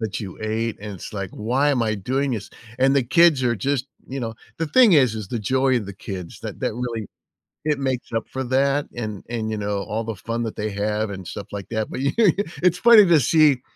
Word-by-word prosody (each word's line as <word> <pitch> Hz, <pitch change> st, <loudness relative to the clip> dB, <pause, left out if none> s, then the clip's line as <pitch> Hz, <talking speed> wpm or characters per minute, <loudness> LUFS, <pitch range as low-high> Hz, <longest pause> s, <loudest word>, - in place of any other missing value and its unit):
that 110 Hz, -2 st, -3 dB
you 95 Hz, -4 st, -7 dB
ate, 110 Hz, +1 st, -2 dB
and 105 Hz, 0 st, -6 dB
it's 90 Hz, -, -9 dB
like, 100 Hz, -3 st, -4 dB
"Why 130 Hz, +7 st, +1 dB
am 125 Hz, -4 st, +1 dB
I 110 Hz, -1 st, 0 dB
doing 135 Hz, +8 st, -1 dB
this?" 110 Hz, -5 st, -4 dB, 0.3 s
And 135 Hz, +1 st, +4 dB
the 140 Hz, -, +3 dB
kids 155 Hz, +2 st, +4 dB
are 120 Hz, -2 st, +1 dB
just 135 Hz, +4 st, -1 dB, 0.2 s
you 135 Hz, 0 st, -5 dB
know? 115 Hz, -1 st, -4 dB, 0.2 s
The 165 Hz, -, -1 dB
thing 235 Hz, +5 st, +6 dB
is 130 Hz, -8 st, +5 dB
is 105 Hz, -2 st, -5 dB
the 120 Hz, 0 st, -3 dB
joy 130 Hz, +4 st, +2 dB
and 105 Hz, -5 st, -2 dB
the 100 Hz, -, -6 dB
kids 95 Hz, -2 st, -7 dB
that -, -, -7 dB
that -, -, 0 dB
really 115 Hz, -4 st, -4 dB, 0.6 s
it 150 Hz, -2 st, +1 dB
makes 130 Hz, -3 st, -2 dB
up 115 Hz, -, 0 dB
for 130 Hz, 0 st, -3 dB
that 140 Hz, +3 st, +2 dB
and 105 Hz, -4 st, -5 dB
and, 110 Hz, -2 st, -3 dB
you 110 Hz, -, -2 dB
know, 105 Hz, -1 st, -2 dB
all 110 Hz, +3 st, -3 dB
the 115 Hz, -1 st, -4 dB
fun 115 Hz, +4 st, -3 dB
that 110 Hz, -, -4 dB
they 105 Hz, 0 st, -2 dB
have 105 Hz, +1 st, -1 dB
and 95 Hz, -3 st, -7 dB
stuff 100 Hz, -, -7 dB
like 100 Hz, -2 st, -6 dB
that. 110 Hz, -1 st, -1 dB
But -, -, -4 dB
you 140 Hz, +1 st, 0 dB, 0.5 s
it's 180 Hz, -1 st, +4 dB
funny 230 Hz, -1 st, +8 dB
to 170 Hz, -4 st, +5 dB
see 145 Hz, -1 st, +4 dB
115 Hz, 240 wpm, -23 LUFS, 105-135 Hz, 0.6 s, funny